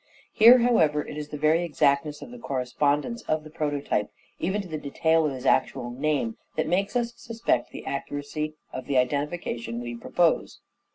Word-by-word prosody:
Here, 235 Hz, +3 st, +9 dB
however, 165 Hz, -12 st, +3 dB
it -, -, -7 dB
is 150 Hz, -1 st, -5 dB
the 150 Hz, -, -5 dB
very 155 Hz, +3 st, +3 dB
exactness 150 Hz, -2 st, +1 dB
of 245 Hz, -, -11 dB
the 245 Hz, -, -10 dB
correspondence 145 Hz, -, -1 dB
of 155 Hz, 0 st, +1 dB
the 155 Hz, -, -12 dB
prototype, 145 Hz, -8 st, -1 dB, 0.3 s
even 190 Hz, +4 st, 0 dB
to -, -, -10 dB
the 155 Hz, -3 st, -4 dB
detail 160 Hz, +2 st, +2 dB
of -, -, -2 dB
his 130 Hz, 0 st, -7 dB
actual 120 Hz, -2 st, +1 dB
name, 135 Hz, -3 st, -1 dB, 0.2 s
that 155 Hz, -, 0 dB
makes 195 Hz, +4 st, 0 dB
us 240 Hz, -1 st, 0 dB
suspect 230 Hz, -, -1 dB
the -, -, -9 dB
accuracy 145 Hz, +2 st, -4 dB, 0.2 s
of 130 Hz, -, -6 dB
the 140 Hz, -2 st, +1 dB
identification 125 Hz, -4 st, -1 dB
we 120 Hz, 0 st, -5 dB
propose. 165 Hz, +7 st, 0 dB
150 Hz, 175 wpm, -26 LUFS, 140-175 Hz, 0.3 s, Here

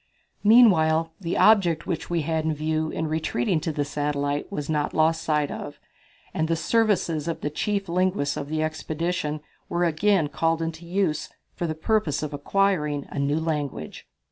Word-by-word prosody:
Meanwhile, 165 Hz, -8 st, +5 dB
the 170 Hz, -1 st, -2 dB
object 190 Hz, -7 st, +4 dB
which 165 Hz, -, -3 dB
we 170 Hz, -2 st, 0 dB
had 160 Hz, +1 st, -1 dB
in 160 Hz, -1 st, 0 dB
view 155 Hz, +1 st, -1 dB
in 160 Hz, -, -3 dB
retreating 155 Hz, 0 st, 0 dB
to 160 Hz, +1 st, -2 dB
the 145 Hz, -1 st, -1 dB
satellite 145 Hz, +2 st, -2 dB
was 150 Hz, -7 st, -4 dB
not 150 Hz, -2 st, -1 dB
lost 160 Hz, +1 st, +3 dB
sight 150 Hz, -3 st, 0 dB
of, 145 Hz, -, -7 dB, 0.5 s
and 160 Hz, -, 0 dB
the 165 Hz, -, +1 dB
services 175 Hz, -5 st, +1 dB
of 165 Hz, -, -3 dB
the 150 Hz, -, -2 dB
chief 200 Hz, +5 st, -1 dB
linguists 180 Hz, -4 st, 0 dB
of 140 Hz, -, -5 dB
the 155 Hz, 0 st, 0 dB
expedition 155 Hz, 0 st, -2 dB, 0.3 s
were 175 Hz, +1 st, 0 dB
again 170 Hz, +1 st, +2 dB
called 165 Hz, +2 st, 0 dB
into 165 Hz, +1 st, -5 dB
use 175 Hz, -4 st, 0 dB, 0.2 s
for 175 Hz, -, -3 dB
the 155 Hz, -, -3 dB
purpose 160 Hz, -3 st, 0 dB
of 150 Hz, -1 st, -4 dB
acquiring 150 Hz, -2 st, 0 dB
a -, -, -4 dB
new 145 Hz, +2 st, +1 dB
language. 145 Hz, -, -4 dB
160 Hz, 170 wpm, -25 LUFS, 150-175 Hz, 0.5 s, Meanwhile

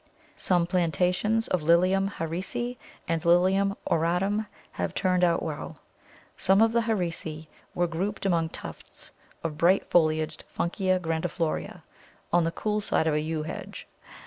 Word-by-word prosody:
Some 175 Hz, -2 st, +2 dB
plantations 180 Hz, +6 st, +1 dB
of 180 Hz, -, +1 dB
Lilium 185 Hz, +5 st, +3 dB
Harrisi 200 Hz, +9 st, -3 dB, 0.3 s
and 165 Hz, -1 st, -1 dB
Lilium 190 Hz, +3 st, +3 dB
auratum 180 Hz, +6 st, +1 dB, 0.2 s
have -, -, -3 dB
turned 180 Hz, -1 st, +2 dB
out 170 Hz, -1 st, +3 dB
well. 155 Hz, -2 st, -5 dB, 0.6 s
Some 190 Hz, +1 st, +3 dB
of 225 Hz, 0 st, +5 dB
the 235 Hz, 0 st, +2 dB
Harrisi 170 Hz, -8 st, -2 dB, 0.3 s
were 175 Hz, -, +2 dB
grouped 190 Hz, +5 st, -3 dB
among 170 Hz, -4 st, +2 dB
tufts -, -, -10 dB, 0.3 s
of 165 Hz, -, -1 dB
the 150 Hz, -, -12 dB
bright 180 Hz, +4 st, +3 dB
foliaged 155 Hz, -2 st, +2 dB, 0.2 s
Funkia 185 Hz, +1 st, +1 dB
grandiflora 165 Hz, -1 st, -2 dB, 0.5 s
on 175 Hz, -1 st, +4 dB
the 165 Hz, -, 0 dB
cool 210 Hz, +4 st, -1 dB
side 160 Hz, -, +1 dB
of 160 Hz, -, +2 dB
a 150 Hz, -, +1 dB
Yew 155 Hz, 0 st, -2 dB
hedge. 155 Hz, -, -7 dB
175 Hz, 145 wpm, -27 LUFS, 165-195 Hz, 0.6 s, of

